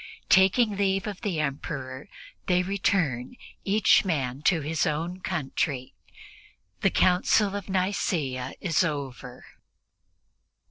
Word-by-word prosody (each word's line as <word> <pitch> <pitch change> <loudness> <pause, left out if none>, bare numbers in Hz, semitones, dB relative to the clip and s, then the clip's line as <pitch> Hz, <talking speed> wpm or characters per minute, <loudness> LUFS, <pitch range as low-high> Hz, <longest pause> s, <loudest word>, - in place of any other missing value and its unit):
Taking 200 +3 +4
leave 195 -1 +1
of 205 -3 -6
the 195 -8 -2
Emperor, 140 0 -4 0.4
they 180 0 +3
return, 180 - -1 0.3
each 210 +2 +4
man 140 -8 -2
to 165 -4 +3
his 155 +2 0
own 165 +4 -2
country. 135 -5 -3 0.9
The 195 - +3
Council 190 +3 +3
of 200 -1 -6
Nicea 165 -9 -1
is 170 -2 +1
over. 135 -5 -5
175 Hz, 105 wpm, -26 LUFS, 140-195 Hz, 0.9 s, Taking